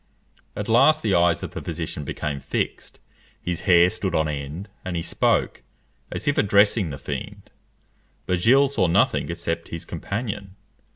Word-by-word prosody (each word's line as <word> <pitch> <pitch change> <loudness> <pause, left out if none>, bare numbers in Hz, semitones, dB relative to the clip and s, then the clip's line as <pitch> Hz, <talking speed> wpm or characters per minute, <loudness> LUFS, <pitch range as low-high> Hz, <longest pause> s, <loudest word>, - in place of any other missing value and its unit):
At 105 - -4
last 135 +7 +5
the 105 - +1
eyes 85 -1 +3
of - - -5
the - - -6
physician 75 - -5
became 70 0 -4
fixed, - - -4 0.4
his 90 -1 -3
hair 85 -1 +7
stood 100 -4 -3
on 80 0 +2
end, 75 +6 -5 0.2
and 95 -1 -4
he 85 - -2
spoke, - - 0 0.5
as - - -5
if 145 - +2
addressing 100 -2 +3
the 70 - -6
fiend. - - -7 0.7
But 90 -1 0
Gilles 135 +8 +5
saw 110 -10 +1
nothing 85 - +2
except 85 0 -3
his 85 - -7
companion. 100 -3 -5
90 Hz, 160 wpm, -24 LUFS, 85-105 Hz, 0.7 s, hair